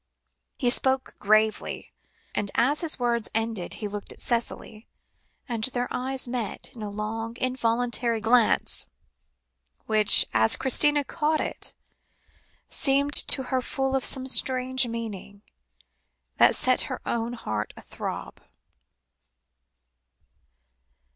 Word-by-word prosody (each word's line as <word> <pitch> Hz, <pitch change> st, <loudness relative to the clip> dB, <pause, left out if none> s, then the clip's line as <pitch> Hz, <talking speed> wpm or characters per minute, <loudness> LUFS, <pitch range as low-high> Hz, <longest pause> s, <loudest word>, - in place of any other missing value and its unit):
'" -, -, -55 dB
He 245 Hz, -3 st, +2 dB
spoke 265 Hz, +1 st, +1 dB
gravely, 215 Hz, +1 st, 0 dB, 0.4 s
and 205 Hz, -1 st, -2 dB
as 280 Hz, +6 st, +2 dB
his 330 Hz, -2 st, +1 dB
words 235 Hz, -2 st, -1 dB
ended, 225 Hz, -5 st, -2 dB
he 210 Hz, -, -5 dB
looked 205 Hz, 0 st, -7 dB
at -, -, -14 dB
Cicely, 230 Hz, -2 st, -2 dB, 0.6 s
and 230 Hz, -3 st, 0 dB
their 245 Hz, -1 st, -2 dB
eyes 260 Hz, +1 st, -2 dB
met 240 Hz, -4 st, -4 dB
in 230 Hz, -, -11 dB
a 210 Hz, -, -4 dB
long 225 Hz, +3 st, -5 dB
involuntary 240 Hz, -2 st, 0 dB
glance, 225 Hz, +1 st, +2 dB, 1.0 s
which, 215 Hz, -1 st, +6 dB
as 110 Hz, 0 st, +5 dB
Christina 290 Hz, +2 st, +4 dB
caught 310 Hz, +2 st, -1 dB
it, -, -, -3 dB, 0.9 s
seemed 280 Hz, +1 st, +1 dB
to 265 Hz, -, +5 dB
her 260 Hz, -, +2 dB
full 270 Hz, +1 st, -2 dB
of 265 Hz, -, 0 dB
some 260 Hz, -1 st, +2 dB
strange 260 Hz, -1 st, +1 dB
meaning, 210 Hz, -3 st, -7 dB, 0.9 s
that -, -, +5 dB
set -, -, +2 dB
her -, -, -4 dB
own 235 Hz, 0 st, -2 dB
heart 110 Hz, -, -4 dB
athrob. -, -, -7 dB
235 Hz, 115 wpm, -25 LUFS, 220-260 Hz, 1.0 s, which